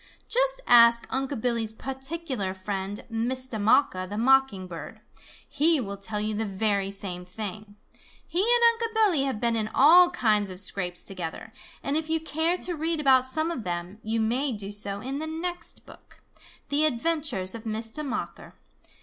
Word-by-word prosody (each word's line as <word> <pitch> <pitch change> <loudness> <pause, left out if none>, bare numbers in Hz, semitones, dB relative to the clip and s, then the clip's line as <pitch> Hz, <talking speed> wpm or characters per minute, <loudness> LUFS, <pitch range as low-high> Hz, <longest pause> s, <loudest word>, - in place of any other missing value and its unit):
Just - - +2
ask 235 -1 +6
Unc' 270 -1 -2
Billy's 230 -3 -1
particular 265 - -4
friend, 195 +1 -5
Mistah 240 +1 -1
Mocker 205 -4 +3
the 205 +2 -6
Mocking 255 -5 +3
Bird. 170 -2 -9 0.5
He 310 +2 +3
will 200 -5 -5
tell 210 +2 -5
you 215 +1 -1
the 215 +1 -1
very 200 -1 0
same 195 -3 -5
thing. 205 +2 -7 0.5
He 350 - 0
and 470 +1 +4
Unc' 455 -1 -3
Billy 380 -11 +3
have 265 -6 -2
been 235 0 +1
in 215 -1 -1
all 350 +5 +7
kinds 215 - +1
of 185 -1 -2
scrapes 180 -2 -4
together, 175 -4 -6 0.3
and 280 - -1
if 315 0 -1
you 320 0 +2
care 320 +2 0
to 360 - 0
read 325 0 -1
about 260 -3 +4
some 315 +5 0
of 255 -9 -5
them, 175 +3 -5
you 225 +1 -1
may 250 +6 0
do 205 -2 -5
so 205 -1 -4
in 270 +4 -4
the 315 - -4
next 340 +2 -4
book - - -17 0.5
The 290 +2 +3
Adventures 295 - 0
of 230 0 -8
Mistah 225 +6 -2
Mocker. 280 - -5
235 Hz, 170 wpm, -26 LUFS, 205-310 Hz, 0.5 s, all